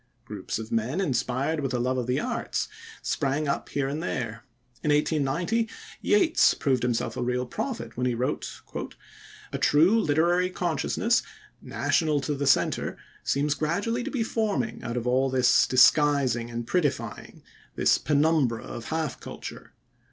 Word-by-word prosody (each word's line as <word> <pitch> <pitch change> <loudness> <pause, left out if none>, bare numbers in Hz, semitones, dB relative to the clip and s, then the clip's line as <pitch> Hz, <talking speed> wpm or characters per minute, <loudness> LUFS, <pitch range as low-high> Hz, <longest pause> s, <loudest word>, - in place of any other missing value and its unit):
Groups - - -5
of 110 0 -7
men 115 - 0
inspired 135 -1 0
with 135 -3 -2
a - - 0
love 130 +1 0
of 125 - -3
the 125 +2 +1
arts 245 +4 -2 0.4
sprang 145 +1 0
up 140 - -2
here 140 -1 -1
and 145 +3 -3
there. 115 -9 -3 0.4
In 150 - -1
1890 160 +9 +1 0.3
Yeats 375 -6 +4
proved 130 -4 +1
himself 120 -2 -1
a - - -3
real 125 +1 0
prophet 230 - -5
when 125 +1 0
he 125 - 0
wrote: 125 +2 -3 0.9
"A - - -2
true 170 +10 +4
literary 175 +4 +2
consciousness 180 - 0 0.4
national 155 -3 +1
to 150 - -2
the 140 0 -2
centre 135 - +2 0.3
seems 145 +1 +1
gradually 200 +11 -1
to - - -3
be 255 -5 -1
forming 215 - -1
out 120 0 -4
of 120 - -3
all 130 +2 +2
this 130 -1 +4
disguising 130 -3 +4
and 120 0 -4
prettifying, 145 -1 -2 0.3
this - - +3
penumbra 145 -5 +2
of 115 - -7
half 160 -4 -2
culture. - - -9
140 Hz, 150 wpm, -26 LUFS, 125-165 Hz, 0.9 s, Yeats